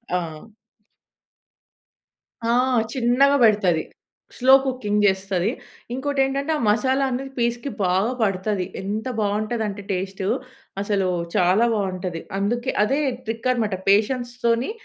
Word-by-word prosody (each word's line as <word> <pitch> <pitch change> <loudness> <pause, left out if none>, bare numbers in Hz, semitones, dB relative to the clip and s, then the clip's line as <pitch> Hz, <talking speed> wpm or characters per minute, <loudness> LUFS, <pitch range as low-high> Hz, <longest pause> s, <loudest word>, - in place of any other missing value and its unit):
ఆ! - - +3 2.3
ఆ! - - +3 0.4
చిన్నగా 260 +3 +3
పెడతది. 195 -7 +3 0.5
స్లో 260 +1 +5
కుకింగ్ 210 -6 0
చేస్తది. 190 -1 +1 0.4
ఇంకోటేంటంటే 275 +2 0
ఆ - - -4
మసాలా 260 +6 +2
అనేది 265 +2 -4
పీస్‍కి 235 +3 -1
బాగా 190 +5 +2
పడుతది. 195 -1 0 0.2
ఎంత 210 +3 -3
బాగుంటదంటే, 210 0 -1
టేస్టు. 190 +1 -3 0.5
అసలు 200 -2 0 0.3
చాలా 185 +6 +4
బాగుంటది. 185 -4 -3 0.2
అందుకే, 235 +5 -1
అదే 270 +7 +1 0.3
ట్రిక్ 225 +2 -3
అన్నమాట 220 -6 -1
పేషెన్స్‌తోని 240 - +1
215 Hz, 100 wpm, -23 LUFS, 195-250 Hz, 2.3 s, స్లో